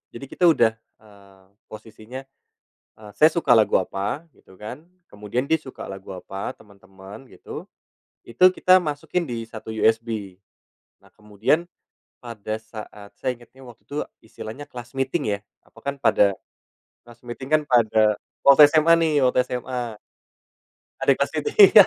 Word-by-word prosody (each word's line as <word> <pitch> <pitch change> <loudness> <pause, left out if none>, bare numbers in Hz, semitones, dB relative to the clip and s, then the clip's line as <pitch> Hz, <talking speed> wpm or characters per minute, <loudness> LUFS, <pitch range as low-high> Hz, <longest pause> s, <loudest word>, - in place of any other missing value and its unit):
Jadi, 135 - -7
kita 180 - +1
udah, 115 -8 +4 0.3
eee, 100 -2 -20 0.3
posisinya, 110 +4 -10 0.8
eee, 105 -1 -11
saya 155 - +7
suka 170 -7 +2
lagu 110 - +4
apa 100 - -4
gitu 95 - -20
kan. 120 +7 -7 0.3
Kemudian 105 +5 -3
dia 160 - +4
suka 130 - -10
lagu 95 0 -10
apa 95 +2 -6
teman-teman 100 +3 -14
gitu. - - -9 0.6
Itu, 180 +11 +5
kita 185 0 +5
masukin 155 +3 -2
di 115 -1 -4
1 110 0 -9
USB. 110 -4 0 0.7
Nah, - - -22
kemudian 105 - 0 0.6
pada 110 -2 -5
saat 105 -2 -11
saya 130 -1 -1
inget 120 -1 -18
ini 135 - -14
waktu 120 -2 -15
itu 145 - -5 0.3
istilahnya 110 +5 -9
class 120 0 -10
meeting 135 -4 -1
ya, - - -17 0.3
apa, - - -21
kan 140 0 -2
pada 100 -4 +3 0.7
class 120 0 -16
meeting 125 +3 -7
kan 155 0 +4
pada 110 -3 +3 0.3
waktu 140 +1 +9
SMA 160 +1 +5
nih, 160 -2 +2
waktu 125 0 +3
SMA. 125 -3 -4 1.0
Ada - - 0
yang - - +2
class 140 - 0
meeting 190 +6 +6
ya. 200 -3 +11
115 Hz, 150 wpm, -23 LUFS, 105-140 Hz, 1.0 s, ya